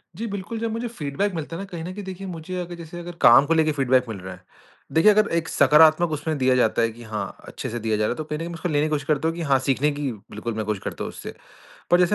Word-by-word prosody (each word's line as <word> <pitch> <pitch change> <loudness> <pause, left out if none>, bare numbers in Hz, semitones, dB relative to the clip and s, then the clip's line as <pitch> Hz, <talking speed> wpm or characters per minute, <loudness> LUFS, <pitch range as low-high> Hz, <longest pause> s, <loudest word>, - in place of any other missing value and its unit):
जी, 225 +6 -4
बिल्कुल, 200 +2 -5
जब 230 0 -2
मुझे 230 +2 -3
फीडबैक 195 0 -2
मिलता 160 +1 -5
है 195 - -5
न, - - -5
कहीं 175 -4 -7
न 180 +2 -5
कहीं 205 0 -7
देखिए 190 +1 -7
मुझे 175 +1 -6
अगर 175 0 -5
जैसे 170 0 -9
अगर 175 0 -8
काम 120 +4 +8
को 165 - +2
लेके 160 -1 +3
फीडबैक 130 -3 +2
मिल 110 - -4
रहा 95 0 -7
है। 90 0 -16 0.5
देखिए 195 +7 +6
अगर 210 0 +3
एक 160 -1 -2
सकारात्मक 155 +4 +5
उसमें 155 0 -2
दिया 130 -1 +3
जाता 115 -2 +2
है 115 - +2
कि 120 +1 -12
हाँ, 110 -1 -5
अच्छे - - -6
से 120 +1 -4
दिया 110 -1 0
जा 105 - 0
रहा - - +1
है, - - -2
तो 155 - -4
कहीं 150 0 -5
न - - -5
कहीं 170 0 -5
उसको 170 +2 -3
लेने 150 0 +2
की - - -1
कोशिश 145 -2 -1
करता 155 0 +1
हूँ 165 - -1
कि 170 - -5
हाँ, 140 -4 +3
सीखने 135 +2 +1
की 145 -2 -3
बिल्कुल 110 +2 -7
मैं 110 0 -3
कोशिश 105 -2 -3
करता - - -4
हूँ - - -4
उससे। - - -8 0.6
पर 175 - +6
जैसे 180 +3 +3
155 Hz, 300 wpm, -24 LUFS, 130-175 Hz, 0.6 s, काम